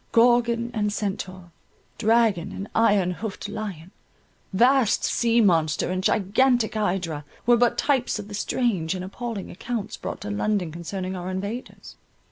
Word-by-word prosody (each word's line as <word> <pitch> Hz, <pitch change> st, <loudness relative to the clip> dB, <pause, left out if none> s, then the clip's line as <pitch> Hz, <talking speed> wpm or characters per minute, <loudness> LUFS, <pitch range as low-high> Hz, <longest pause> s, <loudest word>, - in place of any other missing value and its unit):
Gorgon 235 Hz, 0 st, +3 dB
and 210 Hz, -2 st, 0 dB
Centaur, 190 Hz, -3 st, -4 dB, 0.5 s
dragon 215 Hz, -5 st, +2 dB
and 195 Hz, +1 st, -6 dB
iron 205 Hz, -5 st, +3 dB
hoofed 205 Hz, +2 st, -5 dB
lion, 200 Hz, -5 st, -6 dB, 0.6 s
vast 245 Hz, +3 st, +3 dB
sea 235 Hz, 0 st, +2 dB
monster 165 Hz, -5 st, +2 dB
and 185 Hz, 0 st, -2 dB
gigantic 220 Hz, +5 st, +2 dB
hydra, 180 Hz, -8 st, -1 dB, 0.2 s
were 240 Hz, +1 st, +6 dB
but 240 Hz, 0 st, +2 dB
types 270 Hz, -6 st, +1 dB
of 210 Hz, -1 st, -7 dB
the 210 Hz, -, -9 dB
strange 200 Hz, -5 st, 0 dB
and 185 Hz, 0 st, -4 dB
appalling 225 Hz, 0 st, -5 dB
accounts 215 Hz, +2 st, -4 dB
brought -, -, -6 dB
to 205 Hz, -, -4 dB
London 205 Hz, -4 st, 0 dB
concerning 185 Hz, +3 st, -5 dB
our 180 Hz, 0 st, -5 dB
invaders. 200 Hz, +6 st, -6 dB
205 Hz, 140 wpm, -25 LUFS, 185-235 Hz, 0.6 s, were